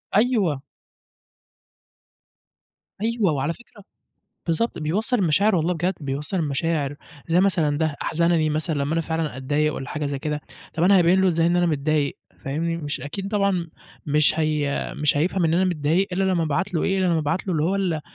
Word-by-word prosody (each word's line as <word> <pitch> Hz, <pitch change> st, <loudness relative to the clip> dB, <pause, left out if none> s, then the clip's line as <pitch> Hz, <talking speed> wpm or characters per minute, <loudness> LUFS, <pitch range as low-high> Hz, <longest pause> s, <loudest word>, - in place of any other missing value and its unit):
أيوه. 205 Hz, -, +2 dB, 2.4 s
أيوه، 225 Hz, -4 st, +1 dB
وعلى 145 Hz, +2 st, -1 dB
فكرة 235 Hz, 0 st, -17 dB, 0.6 s
بالضبط، 180 Hz, +8 st, 0 dB
بيوصّل 200 Hz, +11 st, 0 dB
المشاعر 200 Hz, +3 st, +3 dB
والله 170 Hz, +2 st, +1 dB
بجد، 180 Hz, +3 st, -1 dB
بيوصّل 145 Hz, +5 st, -3 dB
المشاعر، 150 Hz, -2 st, -1 dB, 0.3 s
زي 170 Hz, +2 st, +4 dB
مثلًا 165 Hz, -7 st, +2 dB
ده 155 Hz, -2 st, 0 dB
أحزنني 170 Hz, -1 st, +1 dB
مثلًا 155 Hz, +2 st, -1 dB
لمّا 140 Hz, +2 st, -1 dB
أنا 165 Hz, -, +1 dB
فعلًا 160 Hz, -3 st, -3 dB
أتضايق 145 Hz, +3 st, 0 dB
والّا 135 Hz, -, -6 dB
حاجة 150 Hz, -1 st, -3 dB
زي 140 Hz, -1 st, -3 dB
كده، 150 Hz, +1 st, -3 dB, 0.3 s
طَب 165 Hz, -, -1 dB
أنا 195 Hz, +1 st, +6 dB
هابيّن 180 Hz, +2 st, +4 dB
له 190 Hz, -, +4 dB
إزاي 165 Hz, -1 st, +2 dB
إن 175 Hz, +1 st, +2 dB
أنا 175 Hz, 0 st, +3 dB
متضايق، 150 Hz, -2 st, 0 dB, 0.3 s
فاهمني، 165 Hz, +5 st, -1 dB
مش 145 Hz, -3 st, -4 dB
أكيد 190 Hz, +7 st, -5 dB
طبعًا 200 Hz, -4 st, 0 dB, 0.4 s
مش 150 Hz, +1 st, +3 dB
هي 150 Hz, -2 st, -1 dB
مش 150 Hz, -1 st, +2 dB
هيفهم 175 Hz, +4 st, +1 dB
إن 165 Hz, 0 st, +2 dB
أنا 185 Hz, +2 st, +3 dB
متضايق 175 Hz, +2 st, +1 dB
إلّا 190 Hz, +2 st, +1 dB
لمّا 185 Hz, -3 st, +1 dB
أبعت 175 Hz, +5 st, -1 dB
له 165 Hz, -, +1 dB
إيه، 195 Hz, -, +1 dB
إلّا 185 Hz, -, +2 dB
لمَا 170 Hz, -2 st, +2 dB
أبعت 160 Hz, +5 st, -1 dB
له 185 Hz, -, -1 dB
اللي 155 Hz, -3 st, 0 dB
هو 175 Hz, +5 st, +1 dB
ال 180 Hz, -5 st, -1 dB
165 Hz, 180 wpm, -23 LUFS, 150-185 Hz, 2.4 s, أنا